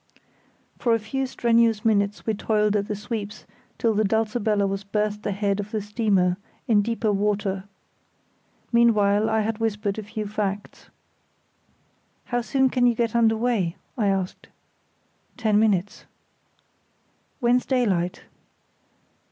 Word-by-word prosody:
For 235 -2 +3
a - - -1
few 265 +5 -3
strenuous 230 -3 +2
minutes 205 -2 +1
we 220 - +1
toiled 210 0 +1
at 200 -1 0
the 210 - -2
sweeps 210 0 -6 0.3
till 230 -1 +1
the 215 +1 +2
Dulcibella 215 -1 +1
was 195 0 -2
berthed 210 +1 -2
ahead 200 0 -1
of 205 0 -4
the 215 - -2
steamer, 200 -4 +1 0.3
in 215 -3 +4
deeper 225 0 0
water. 200 -1 -1 1.1
Meanwhile 215 -3 +3
I 220 0 +2
had 215 +1 -2
whispered 210 -2 -1
a - - -3
few 215 +1 -5
facts. 205 -1 -4 1.4
"How 245 -1 -1
soon 265 +2 +1
can 245 -1 +3
you 240 - +2
get 230 -1 -1
under 225 -1 +4
way?" 220 -8 0 0.2
I 215 -5 0
asked. 190 -2 -2 0.9
"Ten 215 -3 +2
minutes." 205 -3 0 1.3
"When's 245 +1 +2
daylight?" 195 -9 0
210 Hz, 130 wpm, -24 LUFS, 200-230 Hz, 1.4 s, in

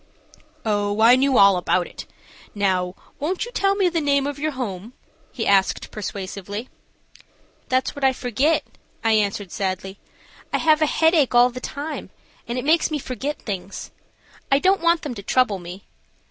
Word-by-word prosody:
"Oh, 205 -1 0
I 230 +3 +7
knew 265 -1 +2
all 200 -1 +7
about 180 0 +1
it. - - -10 0.5
Now, 185 -3 0 0.2
won't 355 +8 -1
you 485 - -9
tell 395 -4 +1
me 390 -2 +2
the 335 -2 0
name 280 -2 +2
of 285 0 -4
your 310 +2 0
home?" 225 -3 -5 0.4
he 230 - -4
asked, 195 -1 +2
persuasively. 200 +2 -6 1.0
"That's 260 0 0
what 285 - -7
I 265 - +5
forget," 260 +6 0 0.4
I 225 - +3
answered, 205 -3 0
sadly. 190 0 -3 0.5
"I - - +1
have 310 -1 +3
a 310 - +4
headache 320 -5 +3
all 245 +1 +6
the 250 - -7
time, 295 +4 -5 0.4
and 235 +1 -3
it 250 - -3
makes 320 +2 +3
me 310 - -1
forget 275 +2 -5
things. 195 -2 -6 0.6
I 275 - +6
don't 380 +5 +2
want 335 -1 +2
them 290 -5 -4
to 205 - -8
trouble 215 -1 +1
me. 180 +2 -9
250 Hz, 170 wpm, -22 LUFS, 200-295 Hz, 1.0 s, I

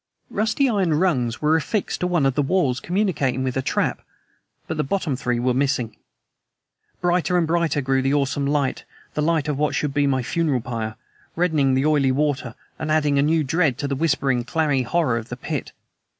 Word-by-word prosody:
Rusty 220 +6 +1
iron 195 -9 +1
rungs 135 -8 0
were 155 +2 +4
affixed 190 +6 -1
to 180 - 0
one 175 -5 +1
of 135 - +2
the 145 - +1
walls 140 -4 +1
communicating 165 -9 0
with 130 -1 -2
a 130 - +1
trap 130 - -1 0.6
but - - -4
the - - +1
bottom 155 -2 -1
three 125 -2 -1
were 125 +1 +1
missing! 125 -4 0 1.1
Brighter 180 0 +2
and 170 - +2
brighter 165 -3 +1
grew 135 0 +1
the 135 +2 +1
awesome 140 0 0
light 145 -2 0 0.3
the 150 - -1
light 160 -1 +1
of 145 -2 -2
what 150 - +1
should 150 -2 -1
be 145 0 +2
my 130 -2 +1
funeral 150 -1 0
pyre 110 -3 -4 0.4
reddening 155 -6 +2
the 135 +2 +1
oily 145 -4 +3
water 140 -3 -1 0.2
and 155 - -3
adding 150 -2 +2
a - - +5
new 155 +2 +2
dread 150 -2 +1
to 145 - -2
the 140 - -1
whispering, 135 -4 +1
clammy 150 -1 +1
horror 125 -2 +1
of 115 +2 -10
the 120 - -5
pit. - - -4
145 Hz, 195 wpm, -22 LUFS, 130-165 Hz, 1.1 s, a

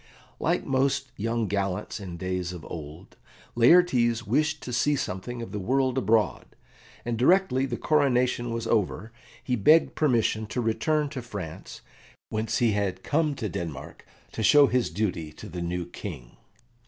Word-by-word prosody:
Like - - 0
most 135 +1 0
young 115 +1 -1
gallants 100 +1 -2
in 90 -4 -7
days 90 -1 -3
of 85 -3 -9
old, 80 +2 -9 0.4
Laertes 120 -4 +4
wished 150 +7 0
to 125 - -6
see 145 +4 +2
something 120 +1 -4
of - - -8
the 105 - -4
world 130 +5 +1
abroad, 115 -4 0 0.5
and 115 -1 -2
directly 135 -2 +3
the 120 -2 -3
coronation 125 -5 +1
was 115 0 -3
over, 110 0 -1 0.3
he 125 - 0
begged 155 +10 +4
permission 115 -6 +1
to 115 - -4
return 145 +6 0
to 135 -3 -6
France, 100 -9 -8 0.5
whence 110 +1 -1
he 120 -2 +3
had 100 -2 -2
come 150 -1 +1
to 110 - -3
Denmark 80 -6 -6 0.3
to - - -5
show 145 +6 +7
his 125 -1 +1
duty 85 -4 -2
to 105 - -10
the 90 -2 -6
new 85 0 -2
King. 75 -9 -9
115 Hz, 155 wpm, -26 LUFS, 95-130 Hz, 0.5 s, show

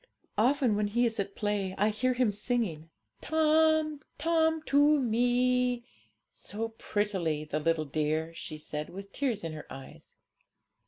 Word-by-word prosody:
Often 255 -1 +3
when 210 0 +1
he 240 +4 +2
is 225 -2 -1
at 200 0 -3
play 205 -3 -1
I 210 +2 +3
hear 255 +4 0
him 245 -4 +2
singing, 205 -7 -2 0.3
"Tome, 315 -1 +3 0.2
tome, 320 0 +2
to 290 +1 +4
Me," 245 0 +2 0.5
so 225 +3 -5
prettily, 195 -8 -1
the 150 0 -2
little 160 0 +1
dear!' 155 +3 -1
she 155 - -7
said, 150 0 -5
with 195 +2 -9
tears 245 -7 -1
in 165 -1 -4
her 155 - -8
eyes. 135 0 -11
220 Hz, 145 wpm, -30 LUFS, 165-255 Hz, 0.5 s, to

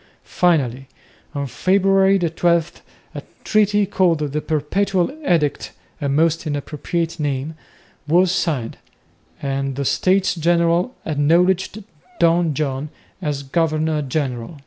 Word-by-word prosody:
Finally, 135 -7 0 0.5
on 140 0 -2
February 195 - +3
12, 170 -1 0 0.3
a - - -6 0.2
treaty 210 -1 +2
called 185 -4 +2
"The 150 +2 -2
Perpetual 180 - 0
Edict," 155 - 0 0.3
a 140 - -1
most 160 +3 +1
inappropriate 155 +3 -3
name, 145 +1 -2 0.5
was 175 +3 +4
signed, 145 -11 -1 0.7
and 135 -1 -2
the 140 +1 -3
States 190 +6 +2
General 170 +6 +1
acknowledged 175 +7 +1 0.4
Don 170 -2 +3
John 140 0 -2 0.3
as 145 -4 -3
governor 155 +1 0
general. 135 0 -3
160 Hz, 105 wpm, -20 LUFS, 145-180 Hz, 0.7 s, was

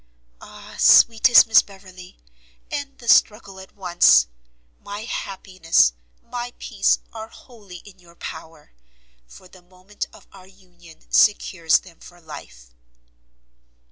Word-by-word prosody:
Ah! - - -14
sweetest 230 +1 +6
Miss 225 - +5
Beverley, 185 -2 -16 0.5
end 280 -1 -6
the 235 - -15
struggle 210 -3 +2
at 190 - -15
once! 175 - +3 0.5
My 205 +1 -9
happiness, 185 - -1 0.3
my 245 0 -7
peace, - - 0 0.2
are 220 -1 -8
wholly 210 -6 -16
in 195 -2 -17
your 170 -1 -21
power, 160 -2 -11 0.6
for 185 - -17
the 185 0 -19
moment 185 +3 -10
of - - -18
our 190 -1 -16
union 175 -4 -21
secures 170 -6 +2
them 170 -3 -19
for 175 0 -16
life. - - -14
185 Hz, 120 wpm, -21 LUFS, 175-210 Hz, 0.6 s, sweetest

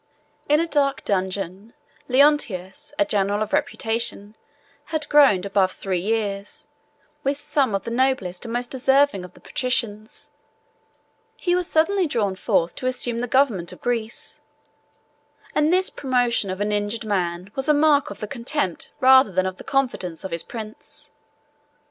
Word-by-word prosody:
In 295 +1 +5
a 335 - +2
dark 280 -4 0
dungeon, 190 +2 -2 0.3
Leontius, 260 -4 +2
a 305 - +3
general 205 -2 +1
of 215 - -7
reputation, 225 -2 -1 0.5
had 310 -2 -3
groaned 270 -11 +5
above 195 -1 +1
three 190 -2 -2
years, 205 0 -3 0.5
with 275 +1 0
some 285 -7 0
of 195 - -2
the 230 - -5
noblest 235 -8 0
and 230 - -5
most 245 +1 -3
deserving 270 -5 +2
of 180 0 -12
the - - -16
patricians: 220 -4 -3 1.1
he 350 - 0
was 360 -1 0
suddenly 360 +3 +2
drawn 210 -8 -1
forth 170 -2 0
to 255 - -2
assume 245 -2 -1
the 245 - -2
government 230 -10 +2
of - - -12
Greece; 235 -2 -3 1.1
and 300 +2 +2
this 370 +1 +3
promotion 245 -6 0
of 185 +1 -4
an 210 +1 0
injured 210 +2 -1
man 180 -2 -2
was 270 +2 -2
a - - +8
mark 295 -1 +3
of 200 - -10
the 210 - -3
contempt 235 - -2
rather 260 -3 +7
than 185 +1 +1
of 185 0 -3
the - - -10
confidence 240 -12 -1
of 190 - -6
his 170 0 -1
prince. 220 +1 -9
230 Hz, 155 wpm, -23 LUFS, 195-275 Hz, 1.1 s, a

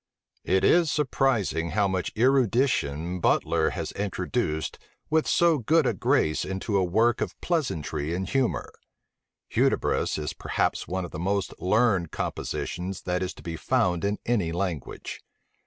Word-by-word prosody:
It 95 0 +2
is 170 -2 +5
surprising 130 - +1
how 105 +1 +2
much 95 -2 -2
erudition 115 - +2
Butler - - +2
has - - -4
introduced 85 -5 -2 0.3
with 160 0 +2
so 170 -3 +4
good 155 +6 +3
a - - +2
grace 75 0 +1
into 95 +3 -3
a 95 - +3
work 110 +6 +2
of - - -3
pleasantry 85 - -1
and 95 +1 -3
humor: 135 +3 -1 0.8
Hudibras - - +1
is 75 -2 -3
perhaps - - -1
one 95 0 -2
of 85 - -9
the 75 - -6
most 100 +2 -1
learned 95 -3 +2
compositions 90 +2 -4
that 90 0 -1
is 95 0 -3
to - - -14
be 85 -1 -4
found 90 +2 +1
in 100 +1 0
any 105 -9 +1
language. 85 -4 -4
95 Hz, 145 wpm, -26 LUFS, 85-120 Hz, 0.8 s, is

